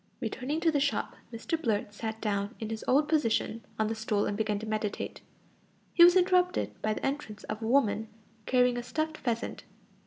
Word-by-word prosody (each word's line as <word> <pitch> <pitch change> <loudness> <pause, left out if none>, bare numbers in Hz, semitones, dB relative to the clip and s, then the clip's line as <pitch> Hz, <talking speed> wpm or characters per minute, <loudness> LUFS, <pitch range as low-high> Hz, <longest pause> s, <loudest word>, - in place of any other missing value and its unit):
Returning 275 +5 -2
to 330 - +4
the 290 - +2
shop, 280 0 0 0.2
Mr 280 +8 -3
Blurt 210 -4 -1
sat 220 +1 -4
down 205 +1 -1
in 220 -1 -4
his 220 - -4
old 290 +3 +4
position 230 -6 +1
on 220 - +2
the 220 - -1
stool 220 -2 0
and 205 - -1
began 210 -1 0
to 215 - -6
meditate. 215 -1 -3 0.7
He 340 - +8
was 350 +1 +8
interrupted 360 0 +3
by 215 0 0
the - - -4
entrance 270 -7 -3
of 215 +1 -5
a 220 - -2
woman 225 -4 +2 0.4
carrying 250 -1 +3
a - - -5
stuffed 310 +4 -2
pheasant. 235 -1 -2
230 Hz, 190 wpm, -30 LUFS, 215-295 Hz, 0.7 s, He